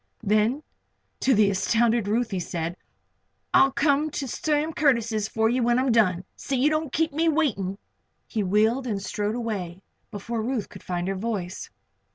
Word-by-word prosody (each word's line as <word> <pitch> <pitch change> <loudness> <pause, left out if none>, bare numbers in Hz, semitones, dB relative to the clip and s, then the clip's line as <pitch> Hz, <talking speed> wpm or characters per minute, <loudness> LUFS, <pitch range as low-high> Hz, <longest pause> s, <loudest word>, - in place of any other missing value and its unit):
Then 215 +7 +2 0.6
to 260 -1 +3
the 205 -1 +4
astounded 225 +3 +2
Ruth 230 +2 0
he 190 - -1
said: 170 -1 -3 0.8
"I'll 270 - +6
come 290 +2 +2
to 280 -2 -4
Sam 305 +4 -1
Curtis' 230 -8 +1
for 220 0 +1
you 245 +3 +1
when 240 +1 +3
I'm 260 0 +2
done. 185 -6 +3
See 275 - -3
you 285 +5 +3
don't 310 -2 -1
keep 320 +1 0
me 325 +2 +2
waiting." 215 - 0 0.5
He 220 - -2
wheeled 220 +7 +2
and 205 -4 -1
strode 205 +2 -2
away 195 -6 -4 0.3
before 225 +2 -4
Ruth 235 -2 -2
could - - -12
find 175 0 -3
her 195 - 0
voice. 195 -3 -4
230 Hz, 170 wpm, -25 LUFS, 200-270 Hz, 0.8 s, I'll